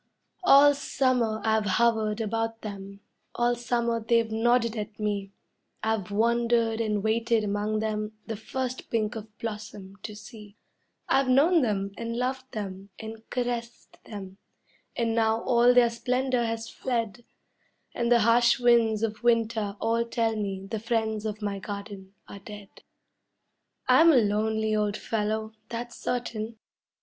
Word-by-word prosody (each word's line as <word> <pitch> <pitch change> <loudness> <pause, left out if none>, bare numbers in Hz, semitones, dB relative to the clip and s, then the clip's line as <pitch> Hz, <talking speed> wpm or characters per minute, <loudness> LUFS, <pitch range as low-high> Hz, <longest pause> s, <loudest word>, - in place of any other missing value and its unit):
All 290 -4 +7
summer 255 -5 0
I've 220 -1 +1
hovered 225 -2 +2
about 225 +1 -2
them, 200 -1 -8 0.3
all 240 0 +2
summer 235 -1 -1
they've 230 0 +2
nodded 235 +1 +2
at 215 -1 -6
me; 205 -2 -2 0.5
I've 220 -4 -1
wandered 230 +1 +2
and 210 -2 -1
waited 225 0 +1
among 210 +1 -1
them 215 0 -2
the 225 - -4
first 255 +4 -5
pink 220 0 -1
of 215 0 -9
blossom 210 -3 -7
to 210 - -7
see; 210 0 -12 0.5
I've 270 -1 +2
known 310 +7 +5
them 200 -5 -1
and 230 0 -3
loved 260 0 -3
and 195 -1 -6 0.4
caressed 240 -1 -4
them, 195 -2 -9 0.6
and 230 -1 0
now 225 0 +1
all 240 -1 +5
their 245 -1 +5
splendor 250 +1 0
has 225 0 -3
fled, 235 -3 -3 0.7
And 235 0 -1
the 235 -1 +6
harsh 235 +3 +4
winds 230 -3 +3
of 220 0 -2
winter 225 -3 +1
all 230 +1 +1
tell 230 -1 -1
me 195 -2 -3
the 220 +2 -4
friends 220 -1 -1
of 210 0 -5
my 200 -1 -2
garden 200 -1 -8
are 200 - -9
dead. 205 -1 -10 1.2
I'm 330 +1 +7
a - - +4
lonely 220 -1 +1
old 210 -1 0
fellow, 220 0 -2 0.2
that's 235 0 -5
certain. 230 -2 -3
225 Hz, 140 wpm, -27 LUFS, 210-235 Hz, 1.2 s, All